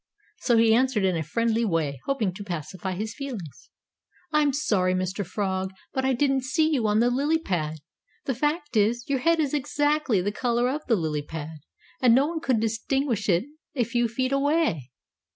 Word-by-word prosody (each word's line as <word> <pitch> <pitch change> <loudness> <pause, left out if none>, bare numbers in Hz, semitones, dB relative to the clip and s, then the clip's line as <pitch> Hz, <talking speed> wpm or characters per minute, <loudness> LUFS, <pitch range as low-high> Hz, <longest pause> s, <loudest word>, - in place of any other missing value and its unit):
So 240 -2 +2
he 225 -1 +5
answered 245 -4 +2
in 185 -2 +2
a 165 - -1
friendly 230 +9 0
way, 160 - -1
hoping 225 -9 0
to 205 +3 -8
pacify 185 +1 -5
his 215 +4 -4
feelings. 230 - -7 0.6
"I'm 300 -2 +3
sorry, 205 -10 +1
Mr. 185 +2 -2
Frog, 190 0 -2 0.2
but 265 - -1
I 265 0 +2
didn't 270 +1 +2
see 260 +5 +1
you 250 -8 +1
on 210 +1 +3
the 240 +1 +3
lily 290 +6 +2
pad. 160 - -2 0.5
The 265 - 0
fact 295 +2 -2
is, 225 +3 +2
your 275 -2 0
head 330 +4 +2
is 295 -3 0
exactly 290 -4 +1
the 195 +3 -1
color 240 +2 0
of 300 +3 -3
the 230 - +4
lily 155 -5 -1
pad, 155 +1 -7 0.4
and 240 -3 +6
no 270 +2 +4
one 325 +1 -3
could 260 -8 +1
distinguish 225 0 -1
it 175 +3 +3 0.3
a 250 - +2
few 240 +1 0
feet 255 +3 -2
away. 275 - +1
230 Hz, 190 wpm, -26 LUFS, 190-275 Hz, 0.6 s, and